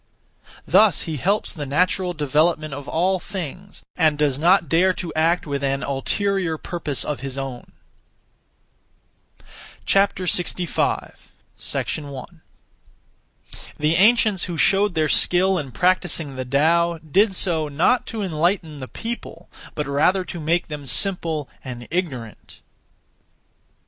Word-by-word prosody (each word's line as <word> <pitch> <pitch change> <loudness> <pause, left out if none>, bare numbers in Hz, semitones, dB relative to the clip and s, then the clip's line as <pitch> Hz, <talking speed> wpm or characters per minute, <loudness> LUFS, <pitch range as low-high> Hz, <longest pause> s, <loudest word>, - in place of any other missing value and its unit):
Thus 215 -3 +4
he 160 -2 -4
helps 200 - +1
the 150 -6 -6
natural 180 +5 +1
development 155 0 +1
of 140 0 -7
all 185 +3 +1
things, 190 0 -7
and 155 -3 +2
does 145 -3 +1
not 175 +1 +4
dare 180 +6 +3
to 175 -2 -5
act 165 +3 +1
(with 140 -2 -3
an 135 0 0
ulterior 175 +5 -1
purpose 155 -5 -3
of 150 - -3
his 135 -1 -6
own). 135 -3 -6 2.1
65. 180 -3 0 0.4
1. 145 +3 -4 1.4
The 150 +2 +1
ancients 215 0 +4
who 175 -2 -5
showed 195 +2 +3
their 155 -1 +2
skill 185 +4 +3
in 140 -3 -5
practising 175 -4 0
the 130 0 -4
Tao 165 +6 +2
did 190 +6 +1
so, 165 -5 +1
not 165 - +1
to 220 -2 -4
enlighten 165 -2 -1
the 130 - -7
people, 235 - -7 0.3
but 150 - -2
rather 155 +7 +2
to 175 - -7
make 165 +3 0
them 150 -3 -7
simple 165 -5 +1 0.2
and 120 -2 -8
ignorant. 135 - -5
165 Hz, 125 wpm, -22 LUFS, 145-185 Hz, 2.1 s, Thus